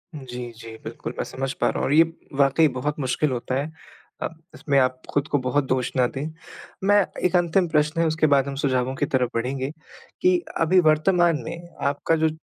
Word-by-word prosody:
जी, 125 -3 -7
जी 115 -1 -9
बिल्कुल - - -6
मैं - - -1
समझ 135 0 -4
पा - - 0
रहा - - -3
हूँ - - 0
और 140 - +1
ये 160 +2 +8 0.3
वाक़ई 140 +3 +4
बहुत 150 +4 -2
मुश्किल 135 +2 0
होता 125 +1 -2
है, 145 +4 -2 0.5
अब 165 -1 -5
इसमें 140 -2 0
आप 130 0 +1
खुद 145 +1 0
को 145 - +1
बहुत 130 +3 +1
दोष 130 -1 0
ना 125 -1 +4
दें। 135 +2 -3 0.6
मैं 205 +1 +5 0.2
एक 180 - +2
अंतिम 175 +1 +3
प्रश्न 155 +2 +1
है 165 - +3
उसके 155 0 +2
बाद 140 -2 +3
हम 140 - -4
सुझावों 130 -1 +1
की 145 - 0
तरफ 130 -5 +1
बढ़ेंगे, 130 +3 -2 0.5
कि 365 0 +4 0.2
अभी 175 +3 +5
वर्तमान 170 +1 +3
में 170 +1 -7 0.2
आपका 145 +3 +1
जो - - +4
145 Hz, 205 wpm, -24 LUFS, 130-160 Hz, 0.6 s, ये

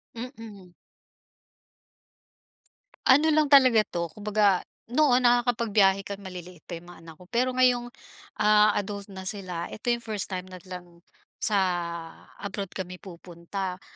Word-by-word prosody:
Mm. 225 -7 -9 2.3
Ano 300 +4 +5
lang 305 -1 +3
talaga 255 -6 +7
'to, 170 -5 -4
kumbaga, 205 -2 +2 0.3
noon 255 -2 +3
nakakapagbiyahe 225 -5 +3
kang 200 0 -6
maliliit 180 -3 -9
pa 170 - -4
'yong 170 - -14
mga 175 -1 -13
anak 165 -1 -12
ko. 180 - -15
Pero 250 +2 +2
ngayong, 245 -1 +3 0.5
ah, 210 0 +5
adult 200 0 -4
na 190 -1 -9
sila, 185 -5 -4
ito 230 - -4
'yong 235 0 0
first 215 -3 -3
time 185 -1 -4
nag 185 -1 -11
lang, 175 -2 -10 0.4
sa 210 -2 +2 0.8
abroad 200 -1 -5
kami 180 -1 -7
pupunta. 180 +1 -7
200 Hz, 135 wpm, -26 LUFS, 180-235 Hz, 2.3 s, talaga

